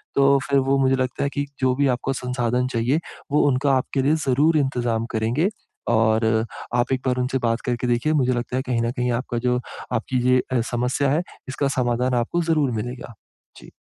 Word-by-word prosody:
तो 140 0 +5
फिर 140 -1 +4
वो, 135 +1 +2
मुझे 135 0 +3
लगता 130 +1 -2
है 140 - +1
कि 145 - 0
जो 130 -1 +2
भी 140 +1 +2
आपको 135 +2 -3
संसाधन 125 -1 -1
चाहिए, 120 +7 +1 0.3
वो 150 - +4
उनका 135 +1 +2
आपके 135 +1 -1
लिए 145 +3 +3
ज़रूर 150 +5 +3
इंतज़ाम 120 -5 0
करेंगे 120 - +1 0.5
और 110 0 +2 0.3
आप 120 +1 +1
एक 130 - -1
बार 125 0 +1
उनसे 130 +1 0
बात 115 +1 0
करके 125 0 -1
देखिए, 120 +6 +1
मुझे 130 -4 +2
लगता 120 +1 -3
है, 130 - +1
कहीं 125 -3 -1
न 115 0 0
कहीं 125 0 -1
आपका 120 -2 -5
जो, 125 0 +2 0.3
आपकी 125 +2 -1
ये 125 0 +5
अ, 120 - +2
समस्या 125 +3 0
है, 155 +4 +2 0.3
इसका 140 +1 -1
समाधान 125 +1 +1
आपको 175 +8 -1
ज़रूर 155 -6 +1
मिलेगा। 120 +2 -5 0.4
जी। - - -14
125 Hz, 200 wpm, -23 LUFS, 120-140 Hz, 0.5 s, तो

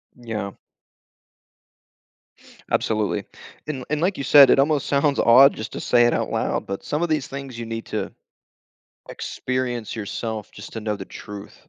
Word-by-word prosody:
Yeah. 110 -5 -5 2.2
Absolutely. 110 -2 0 0.4
And 135 -4 -4
and 150 +1 -1
like 185 +2 +1
you 140 - -3
said, 140 -2 +8
it - - +5
almost 145 +1 +2
sounds 140 0 +2
odd 130 +4 +7
just 110 - -7
to - - -5
say 120 -1 +3
it 120 - +3
out - - -1
loud, - - -1
but 100 0 -5
some 150 - -2
of 175 - -1
these 155 -4 0
things 135 -3 -7
you 115 - -4
need 115 0 -5
to - - -3 1.0
experience 125 -3 -3
yourself 110 0 -5
just - - -11
to 110 - -5
know 105 -1 -2
the 95 -2 -8
truth 105 +1 -10
120 Hz, 165 wpm, -23 LUFS, 110-140 Hz, 2.2 s, said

